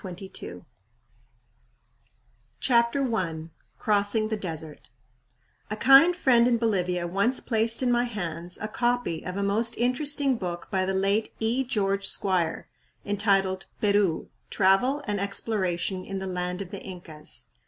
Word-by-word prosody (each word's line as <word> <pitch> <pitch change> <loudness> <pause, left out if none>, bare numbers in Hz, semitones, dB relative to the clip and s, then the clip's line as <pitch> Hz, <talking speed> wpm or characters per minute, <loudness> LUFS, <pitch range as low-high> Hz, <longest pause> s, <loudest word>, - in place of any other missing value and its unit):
INCA 190 +1 -9
LAND - - -10 1.9
CHAPTER 235 0 +2
I 165 -5 -3 0.3
Crossing 210 +1 +1
the 220 - -1
Desert 160 -6 -7 0.8
A 215 - -2
kind 270 +10 +6
friend 245 -8 +4
in 240 -1 +3
Bolivia 180 -6 0
once 200 +9 +1
placed 230 +1 +1
in 250 - +2
my 240 0 +2
hands 175 -6 -5
a 215 - -3
copy 240 -6 -1
of 180 +1 -5
a 200 - -1
most 225 +4 +2
interesting 270 +2 +2
book 175 -4 -5
by 190 -2 +1
the 190 0 -1
late 200 +3 +1
E. 230 +4 +1
George 200 -5 0
Squier, 180 -5 0 0.4
entitled 195 -2 0
"Peru. 200 -5 +1 0.2
Travel 220 +9 +2
and 205 -2 -2
Exploration 190 -2 -2
in 195 - -5
the 190 - -4
Land 180 0 -3
of 185 - -14
the 200 - -7
Incas." 170 -5 -8
200 Hz, 140 wpm, -26 LUFS, 185-235 Hz, 1.9 s, kind